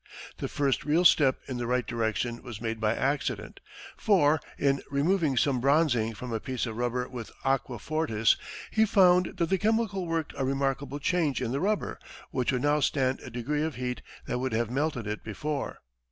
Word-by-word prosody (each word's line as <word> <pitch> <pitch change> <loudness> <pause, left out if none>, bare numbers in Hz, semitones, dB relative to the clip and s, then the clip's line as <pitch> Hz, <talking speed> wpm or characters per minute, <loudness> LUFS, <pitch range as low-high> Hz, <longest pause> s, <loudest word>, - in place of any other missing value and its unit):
The - - -3
first 140 -2 0
real 160 +4 +2
step 135 -6 +5
in 130 - -4
the 120 -1 -3
right 125 -1 +1
direction 115 +1 -2
was 115 -4 -8
made 115 -1 -3
by 110 +1 +1
accident, 140 +3 -2 0.4
for, 160 -8 +3 0.2
in 140 -1 +2
removing 145 0 +1
some 135 -2 +2
bronzing 130 -6 +2
from 125 +1 -6
a 110 - 0
piece 130 +2 -3
of 115 -2 -5
rubber 125 +1 -1
with 120 -4 -7 0.2
aqua 135 -2 0
fortis, 145 -7 +1 0.4
he 220 - +4
found 185 -4 +4
that 170 -2 0
the 190 - +2
chemical 215 -4 +1
worked 165 -2 -2
a 135 - -2
remarkable 135 +1 -1
change 150 -1 +1
in 120 -2 -2
the 135 - -1
rubber, 205 +5 -1 0.3
which 130 -1 0
would 125 -1 -1
now 145 +1 +3
stand 135 -2 +1
a - - -9
degree 135 +6 -2
of 155 -1 -2
heat 125 0 -3 0.2
that 125 - -2
would 130 -2 -2
have 115 0 0
melted 135 -3 -1
it 105 +1 -4
before. 140 +7 -3
135 Hz, 190 wpm, -28 LUFS, 120-155 Hz, 0.4 s, step